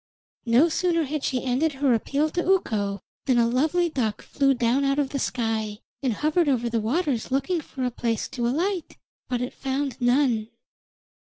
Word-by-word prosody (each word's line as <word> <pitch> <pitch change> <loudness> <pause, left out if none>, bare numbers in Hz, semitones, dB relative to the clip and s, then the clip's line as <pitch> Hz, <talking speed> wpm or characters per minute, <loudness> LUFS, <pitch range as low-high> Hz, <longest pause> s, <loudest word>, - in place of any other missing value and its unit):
No 245 +8 +5
sooner 335 0 +1
had 300 0 -3
she 255 -2 -1
ended 265 +5 +1
her 270 -2 +2
appeal 285 +7 0
to 350 - -1
Ukko 205 - +1 0.3
than 255 -2 +3
a 235 - +5
lovely 310 +9 +2
duck 230 -9 -2
flew 275 -1 +2
down 245 +3 +2
out 275 0 +1
of 285 -2 +1
the 275 - -3
sky, 225 -4 -1 0.2
and 260 -4 +1
hovered 305 - +1
over 240 -3 0
the 230 -1 +1
waters 260 +1 0
looking 275 +6 0
for 265 -2 -6
a 250 - 0
place 230 -2 -2
to 240 -2 -2
alight; 345 +7 -1 0.3
but 245 -1 -1
it 250 - -5
found 270 -1 -3
none. 245 -3 +2
265 Hz, 180 wpm, -25 LUFS, 235-300 Hz, 0.3 s, No